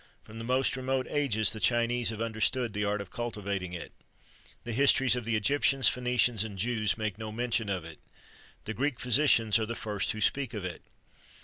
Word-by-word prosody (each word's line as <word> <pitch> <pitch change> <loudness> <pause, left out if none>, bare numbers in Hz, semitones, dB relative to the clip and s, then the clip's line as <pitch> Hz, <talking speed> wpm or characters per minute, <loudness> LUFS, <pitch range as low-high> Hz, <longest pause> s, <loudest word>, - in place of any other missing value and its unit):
From 110 +1 -11
the - - -6
most 130 +3 +1
remote 130 0 -1
ages 115 -8 +3
the 110 - -6
Chinese 120 +3 +1
have 110 -1 -5
understood 115 +1 0
the 105 - -2
art 105 0 -1
of 100 - -10
cultivating 100 -6 -4
it. 85 - -7 0.7
The 120 - -5
histories 135 0 +4
of 125 -2 -4
the 115 -1 0
Egyptians, 135 +3 +3
Phœnicians, 125 -3 +1
and 105 -3 -7
Jews, 110 0 0
make 110 -2 -3
no 110 -1 -5
mention 115 -1 -1
of 90 -4 -3
it. 80 -1 -11 0.7
The 110 - -4
Greek 135 +2 -2
physicians 115 -4 +3
are 110 - -2
the 115 - -4
first 105 -3 -2
who 110 - -7
speak 125 +3 0
of 100 -3 -4
it. 90 -2 -6
115 Hz, 195 wpm, -29 LUFS, 105-125 Hz, 0.7 s, histories